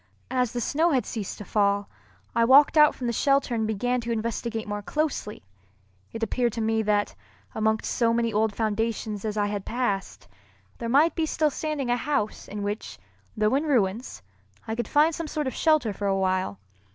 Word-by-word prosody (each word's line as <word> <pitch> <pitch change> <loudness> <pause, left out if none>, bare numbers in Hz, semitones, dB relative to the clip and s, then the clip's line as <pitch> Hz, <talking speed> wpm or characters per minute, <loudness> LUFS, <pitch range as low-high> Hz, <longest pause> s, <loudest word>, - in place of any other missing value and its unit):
As 250 -3 +1
the 245 - -3
snow 315 +8 +2
had 255 - +1
ceased 215 -5 -5
to 210 - -8
fall, 200 0 +1 0.5
I 230 - +4
walked 275 +6 +6
out 300 -1 +6
from 250 - -6
the 235 - 0
shelter 275 +1 +2
and 220 -2 0
began 245 +4 0
to 235 0 -4
investigate 225 0 -3
more 205 0 -3
closely. 270 - -3 0.7
It 225 - -5
appeared 235 +1 0
to 235 - -4
me 220 0 +1
that, 205 -1 +1 0.4
amongst 220 0 0
so 230 -2 +2
many 230 -1 0
old 215 +1 +2
foundations 215 -1 -2
as 215 0 -2
I 205 - +2
had 205 -1 -3
passed, 225 -5 -3 0.5
there 230 - -3
might 295 +7 +4
be 320 -2 -1
still 305 -1 +1
standing 290 -4 -2
a 245 - +2
house 260 -6 -2
in 205 0 -5
which, 205 +2 -4 0.4
though 215 +1 +2
in 280 +3 +2
ruins, 225 - 0 0.4
I 220 - -2
could 235 -1 -3
find 305 +3 +3
some 330 0 -4
sort 300 0 -2
of 260 - -2
shelter 305 -10 +2
for 200 +1 -3
a 195 0 +1
while. 185 - 0
230 Hz, 195 wpm, -26 LUFS, 210-260 Hz, 0.7 s, walked